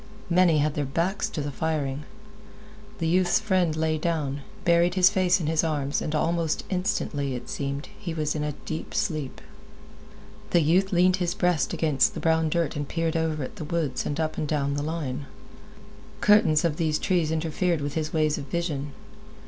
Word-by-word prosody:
Many 175 Hz, -2 st, +5 dB
had 150 Hz, 0 st, +1 dB
their 150 Hz, -, -1 dB
backs 180 Hz, +10 st, -1 dB
to 165 Hz, -, -4 dB
the 145 Hz, 0 st, -3 dB
firing. 150 Hz, -1 st, -2 dB, 0.9 s
The 165 Hz, -, -1 dB
youth's 175 Hz, +1 st, +3 dB
friend 185 Hz, -7 st, +1 dB
lay 155 Hz, 0 st, 0 dB
down, 150 Hz, -4 st, -1 dB, 0.2 s
buried 170 Hz, +1 st, +4 dB
his 185 Hz, 0 st, +6 dB
face 185 Hz, -1 st, +3 dB
in 165 Hz, -, -3 dB
his 160 Hz, +1 st, +1 dB
arms, 145 Hz, -3 st, -1 dB
and 155 Hz, -, -2 dB
almost 165 Hz, 0 st, 0 dB
instantly, 145 Hz, -7 st, -1 dB
it 125 Hz, -, -7 dB
seemed, 140 Hz, +1 st, -3 dB
he 190 Hz, -5 st, -4 dB
was 155 Hz, -2 st, -1 dB
in 150 Hz, -, -2 dB
a 150 Hz, 0 st, -2 dB
deep 160 Hz, 0 st, -5 dB
sleep. 150 Hz, -5 st, -2 dB, 1.1 s
The 175 Hz, -, +4 dB
youth 180 Hz, +5 st, +3 dB
leaned 185 Hz, +1 st, +4 dB
his 175 Hz, 0 st, -1 dB
breast 180 Hz, -9 st, +1 dB
against 150 Hz, -5 st, +2 dB
the -, -, -3 dB
brown 160 Hz, -1 st, +2 dB
dirt 165 Hz, -1 st, 0 dB
and 145 Hz, -1 st, -3 dB
peered 165 Hz, +1 st, -1 dB
over 160 Hz, -3 st, 0 dB
at -, -, -7 dB
the -, -, -5 dB
woods 150 Hz, -4 st, -1 dB
and 145 Hz, +1 st, -3 dB
up 155 Hz, -1 st, -1 dB
and 155 Hz, -, -1 dB
down 140 Hz, -2 st, 0 dB
the 145 Hz, -, -1 dB
line. 145 Hz, -3 st, -3 dB, 0.9 s
Curtains 205 Hz, -7 st, +4 dB
of 155 Hz, -2 st, 0 dB, 0.2 s
trees 175 Hz, -4 st, +1 dB
interfered 160 Hz, +2 st, 0 dB
with 145 Hz, 0 st, -3 dB
his 155 Hz, -1 st, -2 dB
ways 155 Hz, -2 st, +1 dB
of -, -, -6 dB
vision. 145 Hz, -3 st, -3 dB
160 Hz, 180 wpm, -26 LUFS, 150-175 Hz, 1.1 s, his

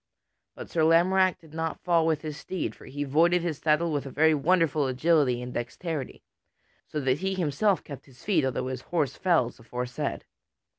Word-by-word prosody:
But -, -, -9 dB
Sir 165 Hz, -, +1 dB
Lamorack 180 Hz, +3 st, +4 dB
did 160 Hz, -2 st, -19 dB
not 160 Hz, 0 st, -3 dB
fall 170 Hz, -2 st, +3 dB
with 155 Hz, -1 st, 0 dB
his 155 Hz, -2 st, -5 dB
steed; 180 Hz, +4 st, -4 dB
for -, -, -15 dB
he 145 Hz, +1 st, -4 dB
voided 165 Hz, +5 st, +3 dB
his 160 Hz, -5 st, -2 dB
saddle 160 Hz, +2 st, +2 dB
with 145 Hz, -2 st, -2 dB
a -, -, -5 dB
very 160 Hz, +4 st, +3 dB
wonderful 155 Hz, -2 st, +2 dB
agility 130 Hz, -2 st, +2 dB
and 125 Hz, 0 st, -7 dB
dexterity, 135 Hz, +4 st, -5 dB, 0.6 s
so 155 Hz, -, -3 dB
that 135 Hz, +1 st, +1 dB
he 190 Hz, +1 st, -1 dB
himself 185 Hz, +4 st, +1 dB
kept 140 Hz, -1 st, -10 dB
his 130 Hz, -2 st, -18 dB
feet, 185 Hz, -8 st, +2 dB
although 130 Hz, -1 st, -1 dB
his 130 Hz, -1 st, -5 dB
horse 150 Hz, -3 st, -1 dB
fell 165 Hz, -10 st, +2 dB
as -, -, -18 dB
aforesaid. 125 Hz, +2 st, -4 dB
155 Hz, 190 wpm, -27 LUFS, 135-170 Hz, 0.6 s, Lamorack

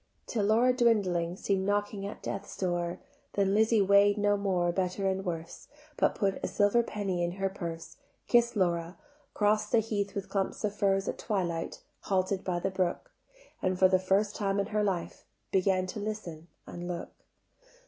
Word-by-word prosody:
Till 215 Hz, -4 st, -1 dB
Laura 235 Hz, +4 st, +4 dB
dwindling 195 Hz, -8 st, +2 dB
Seem'd 195 Hz, 0 st, 0 dB
knocking 205 Hz, 0 st, -1 dB
at 205 Hz, -, -9 dB
Death's 200 Hz, 0 st, -5 dB
door: 175 Hz, -1 st, -1 dB, 0.3 s
Then 195 Hz, -1 st, +2 dB
Lizzie 220 Hz, 0 st, +4 dB
weigh'd 200 Hz, +1 st, +5 dB
no 205 Hz, 0 st, +3 dB
more 185 Hz, -4 st, +1 dB
Better 185 Hz, +2 st, -1 dB
and 190 Hz, 0 st, -1 dB
worse; 165 Hz, -3 st, -5 dB, 0.3 s
But -, -, +2 dB
put 195 Hz, -2 st, 0 dB
a -, -, +1 dB
silver 205 Hz, +3 st, +3 dB
penny 195 Hz, -6 st, -2 dB
in 175 Hz, 0 st, -1 dB
her 195 Hz, +1 st, -1 dB
purse, 170 Hz, -4 st, -7 dB, 0.3 s
Kiss'd 235 Hz, -1 st, +3 dB
Laura, 170 Hz, -2 st, 0 dB, 0.4 s
cross'd 210 Hz, 0 st, +2 dB
the -, -, +5 dB
heath 210 Hz, -2 st, -1 dB
with 200 Hz, -1 st, -3 dB
clumps 195 Hz, +1 st, -2 dB
of 210 Hz, -1 st, 0 dB
furze 195 Hz, -1 st, +1 dB
At -, -, -3 dB
twilight, 175 Hz, -6 st, -2 dB, 0.2 s
halted 190 Hz, 0 st, 0 dB
by 180 Hz, -2 st, -1 dB
the 195 Hz, +3 st, -1 dB
brook: 185 Hz, -, -2 dB, 0.5 s
And 185 Hz, 0 st, 0 dB
for 185 Hz, -, +6 dB
the 185 Hz, 0 st, +3 dB
first 195 Hz, +3 st, +1 dB
time 200 Hz, -1 st, 0 dB
in 200 Hz, -, +1 dB
her 210 Hz, 0 st, +2 dB
life 190 Hz, -4 st, -2 dB, 0.3 s
Began 185 Hz, -1 st, +2 dB
to 185 Hz, +3 st, -6 dB
listen 200 Hz, -7 st, -5 dB, 0.2 s
and 175 Hz, 0 st, -7 dB
look. 175 Hz, -1 st, -5 dB
195 Hz, 175 wpm, -30 LUFS, 180-205 Hz, 0.5 s, for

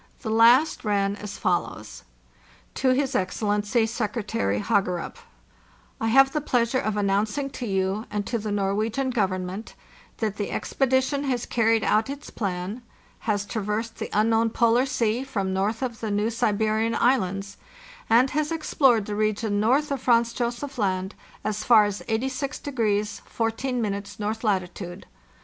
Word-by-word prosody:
The 220 Hz, -, -2 dB
last 235 Hz, +7 st, +5 dB
ran 200 Hz, -2 st, +1 dB
as 205 Hz, 0 st, -7 dB
follows: -, -, -2 dB, 0.7 s
"To 265 Hz, -, +1 dB
his 265 Hz, +1 st, +1 dB
Excellency 210 Hz, +4 st, +1 dB
Secretary 210 Hz, -, -2 dB
HaGERupP: 180 Hz, -, 0 dB, 0.9 s
"T 225 Hz, -, +1 dB
have 270 Hz, +3 st, +6 dB
the 300 Hz, -, -1 dB
pleasure 245 Hz, -2 st, +1 dB
of 215 Hz, -3 st, -2 dB
announcing 210 Hz, +7 st, 0 dB
to 245 Hz, -, -5 dB
you 195 Hz, +2 st, -1 dB
and 205 Hz, -1 st, -2 dB
to 235 Hz, +2 st, -2 dB
the 210 Hz, 0 st, -4 dB
Norwegian 215 Hz, +6 st, 0 dB
Government 190 Hz, -2 st, -2 dB, 0.4 s
that 215 Hz, -2 st, -2 dB
the 205 Hz, -, -2 dB
expedition 270 Hz, +2 st, 0 dB
has 250 Hz, -3 st, -1 dB
carried 225 Hz, -1 st, +2 dB
out 220 Hz, +4 st, +2 dB
its 280 Hz, +1 st, -7 dB
plan, 195 Hz, +2 st, -3 dB, 0.5 s
has 205 Hz, -1 st, +1 dB
traversed 220 Hz, +1 st, -3 dB
the -, -, -5 dB
unknown 225 Hz, +2 st, +3 dB
Polar 235 Hz, +3 st, +3 dB
Sea 235 Hz, -1 st, 0 dB
from 195 Hz, -8 st, -2 dB
north 210 Hz, +6 st, -1 dB
of 235 Hz, -3 st, -3 dB
the 220 Hz, -, -3 dB
New 210 Hz, +2 st, 0 dB
Siberian 220 Hz, 0 st, +1 dB
Islands, 200 Hz, -5 st, +1 dB, 0.5 s
and 245 Hz, +4 st, +5 dB
has 300 Hz, +2 st, -1 dB
explored 270 Hz, -8 st, +2 dB
the 210 Hz, -, -4 dB
region 215 Hz, 0 st, 0 dB
north 265 Hz, +8 st, +2 dB
of 275 Hz, -3 st, -2 dB
Franz 235 Hz, -2 st, +3 dB
Josef 245 Hz, +3 st, -3 dB
Land 190 Hz, -1 st, -1 dB, 0.3 s
as 215 Hz, 0 st, -2 dB
far 220 Hz, -3 st, +6 dB
as 205 Hz, -1 st, -3 dB
86 265 Hz, +5 st, -2 dB
14° 220 Hz, -2 st, -2 dB
north 215 Hz, +2 st, -3 dB
latitude. 185 Hz, -3 st, -2 dB
220 Hz, 145 wpm, -25 LUFS, 205-245 Hz, 0.9 s, have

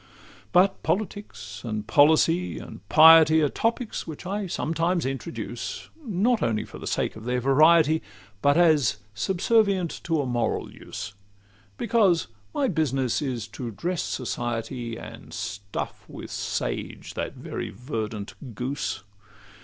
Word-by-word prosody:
But 190 Hz, +2 st, +4 dB
politics, 185 Hz, -, -3 dB
and 110 Hz, -3 st, -3 dB
policy, 160 Hz, +7 st, +4 dB
and -, -, -9 dB
piety, 160 Hz, 0 st, +8 dB
Are 145 Hz, -, +3 dB
topics 230 Hz, -, -2 dB
which 160 Hz, +2 st, -8 dB
I 200 Hz, +1 st, -2 dB
sometimes 165 Hz, +1 st, 0 dB
introduce, 135 Hz, +5 st, -5 dB
Not 225 Hz, +1 st, +1 dB
only 110 Hz, -2 st, 0 dB
for -, -, -11 dB
the -, -, -7 dB
sake -, -, -1 dB
of 110 Hz, +1 st, -10 dB
their 125 Hz, 0 st, 0 dB
variety, 155 Hz, +4 st, +5 dB, 0.4 s
But 145 Hz, +2 st, +4 dB
as 155 Hz, -, +4 dB, 0.2 s
subservient 190 Hz, -, +2 dB
to 165 Hz, -2 st, +1 dB
a 140 Hz, -, 0 dB
moral 120 Hz, -2 st, -1 dB
use; 100 Hz, +1 st, -7 dB, 0.6 s
Because 205 Hz, -7 st, +3 dB, 0.3 s
my 275 Hz, -, +1 dB
business 135 Hz, -, 0 dB
is 125 Hz, -6 st, -3 dB
to 125 Hz, -3 st, -6 dB
dress 170 Hz, -, -2 dB
society, 120 Hz, -1 st, -3 dB
And -, -, -10 dB
stuff 100 Hz, 0 st, -5 dB
with -, -, -9 dB
sage -, -, -3 dB
that -, -, -4 dB
very -, -, -5 dB
verdant 110 Hz, -3 st, -5 dB, 0.2 s
goose. 125 Hz, -4 st, -3 dB
150 Hz, 130 wpm, -26 LUFS, 120-175 Hz, 0.6 s, piety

